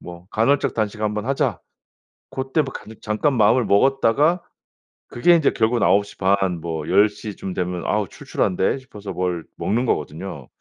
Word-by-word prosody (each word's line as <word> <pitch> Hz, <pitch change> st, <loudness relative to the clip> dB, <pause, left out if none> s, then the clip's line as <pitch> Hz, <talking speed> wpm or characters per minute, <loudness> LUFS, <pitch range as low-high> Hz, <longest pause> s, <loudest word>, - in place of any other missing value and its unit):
뭐 85 Hz, 0 st, -11 dB
간헐적 130 Hz, +6 st, +1 dB
단식 105 Hz, -1 st, -2 dB
한번 105 Hz, 0 st, -1 dB
하자." 135 Hz, +1 st, 0 dB, 0.7 s
고때 135 Hz, +4 st, 0 dB
뭐 135 Hz, -, -6 dB
간 -, -, -9 dB
잠깐 110 Hz, +7 st, 0 dB
마음을 115 Hz, +2 st, +4 dB
먹었다가 135 Hz, -, +3 dB, 0.7 s
그게 170 Hz, +9 st, +4 dB
인제 160 Hz, -4 st, +3 dB
결국은 115 Hz, +1 st, +1 dB
9:30 95 Hz, -3 st, +1 dB
뭐 80 Hz, -2 st, -4 dB
10:00 105 Hz, +1 st, +2 dB
쯤 95 Hz, -, -6 dB
되면 90 Hz, -1 st, -3 dB
아우 105 Hz, -1 st, 0 dB
출출한데 95 Hz, +8 st, -1 dB
싶어서 105 Hz, -6 st, -9 dB
뭘 90 Hz, -2 st, -2 dB
먹는 120 Hz, +5 st, 0 dB
거거든요. 75 Hz, -, -3 dB
105 Hz, 285 characters per minute, -22 LUFS, 95-125 Hz, 0.7 s, 마음을